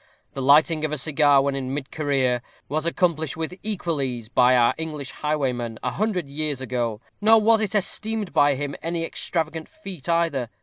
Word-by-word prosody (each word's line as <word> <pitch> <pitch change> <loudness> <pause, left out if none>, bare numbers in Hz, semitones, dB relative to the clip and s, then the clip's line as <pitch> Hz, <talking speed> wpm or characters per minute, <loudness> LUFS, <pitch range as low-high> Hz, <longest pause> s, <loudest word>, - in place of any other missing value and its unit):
the 135 - -4
lighting 155 +3 +4
of 155 - -1
a 155 - -2
cigar 145 -1 +3
when 140 0 0
in 135 0 -3
mid 140 -2 -5
career, 135 -5 0 0.3
was 155 +3 -1
accomplished 160 -4 0
with 160 +2 -3
equal 175 -8 0
ease 120 -4 -4
by 125 +1 +4
our 120 -1 +4
English 150 -4 -5
highwayman 125 -7 -2
a 125 - -1
hundred 190 - -1
years 145 -1 -2
ago, 120 -4 -2 0.2
nor 220 +2 +6
was 220 +1 +4
it 215 -1 -1
esteemed 215 +1 -1
by 145 -1 +4
him 145 +1 -4
any 165 0 -2
extravagant 160 -1 -3
feat 195 - -8
either. 165 -8 +1
150 Hz, 180 wpm, -24 LUFS, 135-170 Hz, 0.3 s, nor